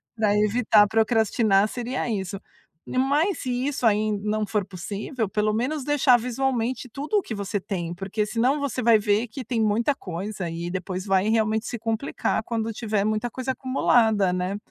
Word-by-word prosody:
para 215 -2 +2
evitar 210 0 +4
procrastinar, 220 -2 +2
seria 245 +2 -3
isso. 195 -2 -3 0.5
Mas 285 +9 +1
se 250 0 -2
isso 285 -4 -2
aí 215 0 +3
não 215 0 0
for 210 -2 -1
possível, 200 +5 -4
pelo 210 +2 0
menos 265 +6 -1
deixar 265 -3 +4
visualmente 250 0 -2
tudo 290 - -2
o - - +3
que 225 - -6
você 200 0 -2
tem, 180 -4 -4
porque 195 +4 -2
senão 240 +7 +1
você 280 -3 -2
vai 230 -1 +6
ver, 210 +3 +1
que 255 +3 -8
tem 230 0 -1
muita 220 +6 +2
coisa 185 -2 -5
e 170 +1 -5
depois 185 0 -4
vai 195 +1 +2
realmente 220 0 +1
se 240 - -4
complicar 225 +1 -1
quando 225 -1 -2
tiver 215 -2 -1
muita 215 +3 0
coisa 260 0 -3
acumulada, 225 -7 +2
né. 180 +2 -2
220 Hz, 170 wpm, -24 LUFS, 205-250 Hz, 0.5 s, vai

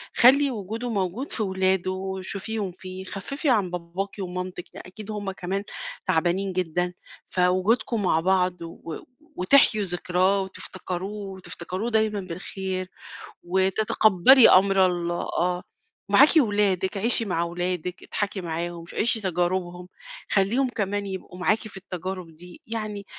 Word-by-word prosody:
خلّي 275 +3 +6
وجوده 225 +2 -4
موجود 200 +5 -2
في 220 - 0
ولاده 190 -1 +1
وشوفيهم 190 +2 -4
فيه، 185 +1 -9
خفّفي 275 - -3
عن 200 -7 +2
باباكِ 180 +3 -4
ومامتِك، 180 -1 -5
ي - - -7
أكيد 210 +3 -9
هُم 205 -2 -3
كمان 190 +1 -3 0.4
تعبانين 185 +2 +1
جدًا، 180 0 -1 0.3
فوجودكم 190 +5 +1
مع 160 -3 +3
بعض 180 0 +1
و 165 -1 -7 0.4
وتحيوا 215 +1 +5
ذكراه 185 +2 +1
وتفتكروه 190 +1 -5
وتفتكروه 185 +3 -5
دايمًا 220 -2 +1
بالخير، 185 +1 -4 0.6
وتتقبّلي 195 +5 +5
أمر 190 0 +5
الله 175 -1 -1
آه، 180 +1 -1 0.5
معاكِ 265 +9 +7
ولادِك، 205 - +2
عيشي 230 +3 +3
مع 170 -4 0
ولادِك 175 +1 -3
اضحكي 200 -1 -3
معاهم 170 0 -4
عيشي 230 0 +1
تجاربهم، 180 -1 -1 0.4
خلّيهم 230 +7 +2
كمان 205 -3 -2
يبقوا 190 -2 -7
معاكِ 215 +4 +2
في 200 - -10
التجارب 185 -2 -6
دي، 175 +2 -13
يعني 215 -3 -4
190 Hz, 125 wpm, -25 LUFS, 180-205 Hz, 0.6 s, معاكِ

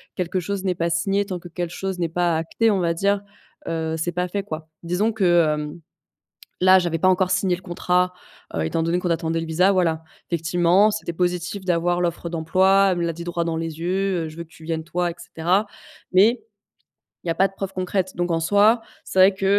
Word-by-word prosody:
quelque 180 0 -1
chose 195 +2 -3
n'est 185 -1 +1
pas 170 0 -1
signé, 195 +4 +1
tant 185 -2 -5
que 175 0 -11
quelque 175 0 -4
chose 190 -2 -4
n'est 170 - +1
pas 175 -1 +1
acté, 220 +8 +1
on 195 - +1
va 170 -2 +1
dire, 200 +3 +1 0.5
heu, 160 -1 -2
c'est 175 +2 -2
pas 180 +1 -1
fait, 200 +2 -3
quoi. 155 -4 -7 0.2
Disons 185 +6 0
que, 175 -6 +4
hem, 150 +2 -6 0.8
là 185 0 +7
j'avais 175 -2 -1
pas 185 - +3
encore 185 0 +2
signé 185 -1 +2
le - - -15
contrat, 180 +1 0 0.4
heu, 80 - 0
étant 160 - -1
donné 170 +2 +1
qu'on 180 - -2
attendait 165 0 -1
le 165 - -4
visa, 180 +5 +3
voilà. 165 -3 +1 0.3
Effectivement, 175 +4 +3
c'était 210 -5 -4
positif 180 +2 -2
d'avoir 175 0 +1
l'offre 170 -1 -2
d'emploi, 190 +4 +3
elle 175 - -1
me 170 - 0
l'a 165 - -1
dit, 170 +1 -8
droit 175 -1 -1
dans 165 -1 -1
les 165 -1 -4
yeux, 185 0 0
heu: - - -5
«je 155 - -13
veux 170 - -5
que 160 - -21
tu 165 - -16
viennes 160 -1 -2
toi» 175 0 -1
et - - -11
cetera, 180 +6 0 0.5
mais 215 +7 +5 0.8
il - - -9
y 165 - +2
a - - -2
pas 195 - +4
de 195 - -19
preuves 195 -1 -5
concrètes. 185 0 -2
Donc 175 0 -1
en 165 - +1
soi, 205 +7 +4 0.2
c'est - - -7
vrai 190 +1 +7
que, 190 0 -4
175 Hz, 230 wpm, -23 LUFS, 165-190 Hz, 0.8 s, là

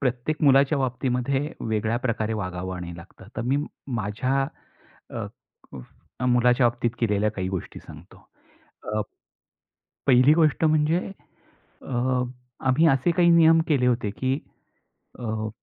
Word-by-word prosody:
प्रत्येक 130 +4 -2
मुलाच्या 140 +1 +4
बाबतीमध्ये 130 +3 -1
वेगळ्या 110 +1 -1
प्रकारे 115 -3 -2
वागावं 95 -2 -4
आणि 85 -1 -7
लागतं. 85 +3 -14
तर 115 - -2
मी 130 +4 +1 0.4
माझ्या 125 +7 -1 0.7
अ, - - -4 0.5
व 65 - -10
मुलाच्या 125 0 +4
बाबतीत 120 0 -2
केलेल्या 105 -2 +1
काही 95 -3 -3
गोष्टी 95 -2 -5
सांगतो. - - -15 0.7
अ - - +1 1.1
पहिली 130 +2 +6
गोष्ट 155 -1 +2
म्हणजे, 155 +1 +3 0.9
अ, 125 0 0 0.5
आम्ही 145 +6 +4
असे 135 +3 +2
काही 170 0 +4
नियम 165 -1 +6
केले 135 -5 +2
होते, 120 -4 +1
की 130 +6 -1 0.8
अ 110 -2 -3
125 Hz, 125 wpm, -25 LUFS, 110-140 Hz, 1.1 s, पहिली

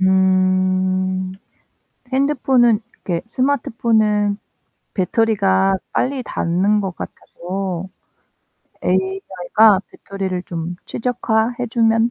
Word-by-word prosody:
음. 185 0 +2 0.8
핸드폰은 260 -4 +3 0.3
이렇게 170 -3 -1
스마트폰은 225 -5 +1 0.6
배터리가 195 -1 +2 0.2
빨리 265 +1 0
닳는 195 +1 +1
것 190 -3 -4
같아서 185 0 -5 1.0
'AI가 190 +2 +2
배터리를 190 -2 -5
좀 170 0 -5
최적화해 240 0 -1
주면 225 0 +3
195 Hz, 195 characters per minute, -19 LUFS, 185-225 Hz, 1.0 s, 핸드폰은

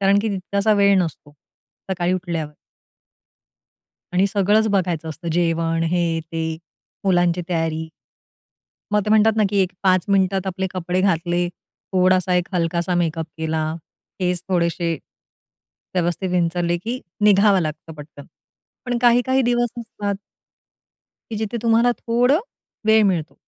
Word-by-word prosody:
कारण 195 +1 +4
की 225 - 0
तितकासा 200 +2 0
वेळ 200 -1 +4
नसतो 150 -3 -7 0.6
सकाळी 180 -1 0
उठल्यावर. 170 -4 -3 1.6
आणि 185 +2 +3
सगळंच 205 +2 +2
बघायचं 175 -5 0
असतं. 160 +2 -6
जेवण 165 -1 +1
हे, 170 -2 0
ते, 160 0 -4 0.5
मुलांची 175 -2 +2
तयारी. 160 -2 -1 1.0
मग 210 - +4
ते 210 - -2
म्हणतात 220 0 +4
ना, 215 - +3
की 200 - +1
एक 185 0 -2
5 185 -2 +3
मिनिटात 195 -1 +2
आपले 190 0 -2
कपडे 180 0 -2
घातले, 175 -1 +1 0.4
थोडासा 185 0 +3
एक 180 -1 +1
हलकासा 170 +1 0
मेकअप 165 -1 -2
केला, 160 0 -1 0.5
केस 180 -2 -1
थोडेसे, 170 -1 0 1.0
व्यवस्थित 175 +1 0
विंचरले, 175 -1 +1
की 230 +8 -5 0.2
निघावं 200 -1 +5
लागतं 155 0 -5
पटकन. 150 -1 -12 0.6
पण 245 -1 0
काही-काही 245 +2 +3
दिवस 240 0 +1
असतात 205 -3 -4 1.2
की 220 - -3
जिथे 220 +2 -3
तुम्हाला 230 +1 +4
थोडा, 245 +5 +2 0.5
वेळ 220 0 +6
मिळतो. 165 -4 -2
180 Hz, 130 wpm, -21 LUFS, 170-200 Hz, 1.6 s, वेळ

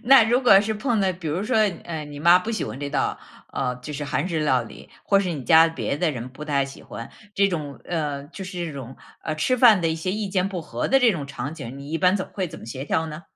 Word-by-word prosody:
那 255 -1 +7
如 240 +3 +2
果 195 -5 +7
是 220 +1 -2
碰 230 0 0
到 190 -1 +2
比 170 -1 -9
如 170 +6 -1
说， 225 +2 0 0.3
呃， 160 -3 -5
你 145 -1 -9
妈 170 +3 +6
不 215 +5 -4
喜 220 - -2
欢 135 - -6
这 145 - -3
道 - - -1 0.3
呃， 125 0 -1
就 125 +4 -8
是 145 +1 -4
韩 150 +5 -1
式 160 -3 -1
料 130 -5 +2
理， 115 - -12 0.2
或 200 - +4
是 185 -3 -1
你 145 -5 -5
家 160 +5 +7
别 160 -3 -3
的 170 0 +1
人 125 -2 -6
不 135 +4 -9
太 140 -2 +1
喜 135 0 -11
欢 115 - -8 0.2
这 200 0 +3
种 145 -8 -4
呃， 150 -5 -3
就 190 +3 -8
是 180 -2 -4
这 155 - -6
种， 130 -2 -8 0.3
呃， 155 - -2
吃 255 +12 +1
饭 225 -6 +7
的 165 - +1
一 160 - 0
些 165 +3 -3
意 210 -1 -2
见 190 0 0
不 185 -3 -4
合 - - -3
的 270 - +5
这 240 -4 +4
种 150 -5 -4
场 140 +2 -5
景， 135 -3 -8
你 140 +2 -9
一 165 - -1
般 185 +2 +4
怎 185 - -3
么 - - -24
会 190 -2 -1
怎 - - -10
么 - - -11
协 130 +4 -6
调 160 +2 0
呢？ 155 +2 -8
165 Hz, 305 characters per minute, -24 LUFS, 140-195 Hz, 0.3 s, 那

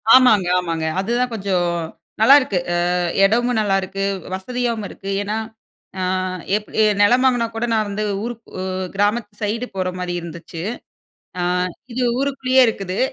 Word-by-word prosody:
ஆமாங்க, 220 -8 +5
ஆமாங்க. 165 -2 -2
அதுதான் 240 +4 0
கொஞ்சம் 190 -4 0 0.5
நல்லாயிருக்கு 255 -5 +6 0.2
அ - - +2 0.5
இடமும் 240 +3 +2
நல்லாயிருக்கு, 195 -1 0 0.3
வசதியாவும் 230 +1 -2
இருக்கு. 195 - -10
ஏன்னா 210 +2 -2 0.6
அ - - -1 0.5
எப்-எ 215 +1 0 0.2
நிலம் 245 +5 +4
வாங்கினா 245 -3 +2
கூட 225 - -2
நான் 215 -1 +1
வந்து 205 +1 -2 0.2
ஊர் 240 - -3 0.2
உ 185 - -3 0.3
கிராமத்து 205 +1 -1
சைடு 225 +4 -1
போற 185 -1 0
மாரி 180 -1 -3
இருந்துச்சு. 170 0 -8 0.8
அ 175 - 0 0.5
இது 255 - -1 0.2
ஊருக்குள்ளேயே 265 -1 +3
இருக்குது. 195 -3 -3
210 Hz, 135 wpm, -20 LUFS, 190-240 Hz, 0.8 s, நல்லாயிருக்கு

